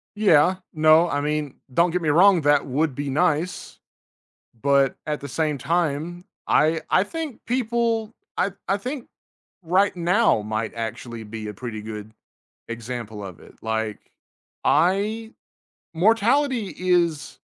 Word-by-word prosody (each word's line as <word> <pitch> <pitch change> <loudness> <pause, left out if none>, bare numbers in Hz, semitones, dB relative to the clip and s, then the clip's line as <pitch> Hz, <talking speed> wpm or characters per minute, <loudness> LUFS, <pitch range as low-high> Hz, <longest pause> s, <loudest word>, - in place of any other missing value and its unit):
Yeah, 185 -4 +4 0.2
no, 155 +2 +5
I 145 - -1
mean, 150 -1 -2 0.2
don't 170 +4 +3
get 180 +1 -1
me 160 - 0
wrong, 180 +3 +6
that 145 -1 +3
would 145 +3 0
be 145 +1 -3
nice, 160 +4 -1 0.8
but 140 0 +3
at 150 -1 -2
the 140 - -7
same 150 +2 -1
time, 170 +3 -1 0.2
I 160 +1 +3
I 185 - +4
think 310 +1 -6
people 235 -2 0 0.2
I 195 - 0 0.2
I 195 - +2
think 250 +5 -5 0.6
right 185 +4 +2
now 180 - +3
might 110 +1 -3
actually 115 0 -5
be 110 0 -7
a 105 - -6
pretty 110 0 -6
good 105 0 -8 0.6
example 115 -2 -6
of 95 -4 -9
it. - - -16
Like, 110 -1 -2 0.6
I 210 +5 +2 0.6
mortality 225 - +2
is 175 -5 0
160 Hz, 135 wpm, -23 LUFS, 125-195 Hz, 0.8 s, wrong